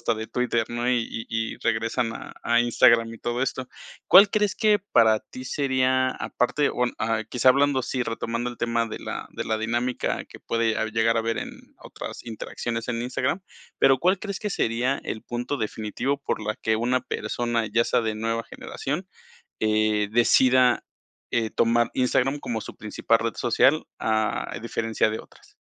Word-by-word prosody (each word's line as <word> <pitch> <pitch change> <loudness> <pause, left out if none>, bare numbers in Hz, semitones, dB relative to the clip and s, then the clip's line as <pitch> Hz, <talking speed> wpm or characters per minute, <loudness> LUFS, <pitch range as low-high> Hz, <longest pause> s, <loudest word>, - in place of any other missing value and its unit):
hasta 115 - 0
de 110 0 -5
Twitter, 120 -2 0
¿no?, 120 +1 -2
y 120 -2 +1
y 115 - -5 0.3
y - - -15
regresan 115 +1 0
a - - -8
a 120 0 +3
Instagram 115 -1 +4
y 115 - -12
todo 120 +2 -2
esto, 130 -1 -2 0.4
¿cuál 200 +2 +8
crees 210 -2 +1
que 215 -2 +3
para 110 -2 +5
ti 130 - -10
sería, 130 -1 +1
aparte 140 +4 0
o, 125 - 0
ah, 110 - -1
bueno, 110 -1 0
quizá 125 +1 +2
hablando 140 +1 +4
así, 130 +1 -2
retomando 115 +1 -3
el 120 - -10
tema 115 0 0
de 110 - -7
la - - -5
de - - -4
la 110 0 -1
dinámica 120 +3 -1
que - - -13
puede 115 -1 0 0.2
llegar 115 +1 +2
a - - +3
haber 115 0 -2
en - - -8
otras - - -8
interacciones 115 0 -5
en 115 -1 -2
Instagram, 130 +7 -1 0.4
¿pero 135 -1 +5
cuál 185 +5 +2
crees 200 -3 -4
que 210 - -3
sería 125 - 0
el 110 - -5
punto 120 +4 -3
definitivo 110 +5 -2
por - - -2
la 110 0 -2
que 110 0 0
una 125 +3 +1
persona, 115 0 -2
ya 115 +2 +2
sea - - +2
de 110 -2 -2
nueva 115 +1 -2
generación, 150 +11 -5 0.5
eh, 110 -1 +2
decida, 125 +1 +4 0.5
eh, 115 -2 +1
tomar 120 0 +2
Instagram 130 +2 +1
como 115 -4 -3
su - - -9
principal 110 +2 0
red 115 -1 -2
social, 130 +6 +3
a 110 -1 -1
diferencia 115 -1 0
de 110 - -3
otras? - - -20
120 Hz, 180 wpm, -25 LUFS, 115-130 Hz, 0.5 s, cuál